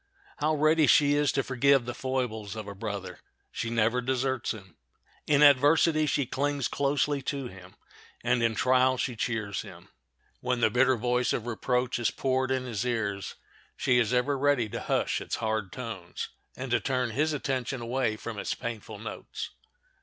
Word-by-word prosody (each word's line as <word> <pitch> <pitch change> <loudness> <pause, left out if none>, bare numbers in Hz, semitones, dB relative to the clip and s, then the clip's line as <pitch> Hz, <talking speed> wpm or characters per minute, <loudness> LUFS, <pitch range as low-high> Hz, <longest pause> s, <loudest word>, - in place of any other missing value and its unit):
How 155 0 +1
ready 155 0 +4
she 145 -1 +5
is 145 -1 +3
to 135 - +1
forgive 135 0 +3
the 120 - -4
foibles 120 -6 -3
of 110 -2 -6
a 100 - -6
brother! 100 -2 -5 0.3
She 115 - -3
never 115 +2 +2
deserts 130 0 -1
him. 95 -6 -9 0.5
In 150 0 +5
adversity 150 +3 +5
she 140 -1 +1
clings 140 +1 -1
closely 140 0 0
to 135 -1 -3
him, 95 0 -13 0.5
and 120 0 +2
in 115 -1 +2
trial 130 +2 +3
she 125 -1 -2
cheers 110 -3 -2
him. - - -12 0.5
When 125 -1 -1
the 110 - +3
bitter 130 +2 +4
voice 125 +2 +1
of 115 - -2
reproach 125 +1 -1
is 120 - +2
poured 130 0 0
in 130 -1 0
his 115 -3 -2
ears 105 -6 -2 0.4
she 125 -1 +3
is 115 -3 +1
ever 125 +3 +2
ready 140 -5 +2
to - - -4
hush - - 0
its - - -3
hard 110 -3 -2
tones, 110 -9 -6 0.3
and 130 -1 -5
to - - +4
turn 125 -3 -1
his 150 +7 +1
attention 135 -3 -2
away 120 -1 -1
from 110 -1 -6
its - - -2
painful 110 -3 -6
notes. 115 - -7
125 Hz, 175 wpm, -28 LUFS, 110-135 Hz, 0.5 s, she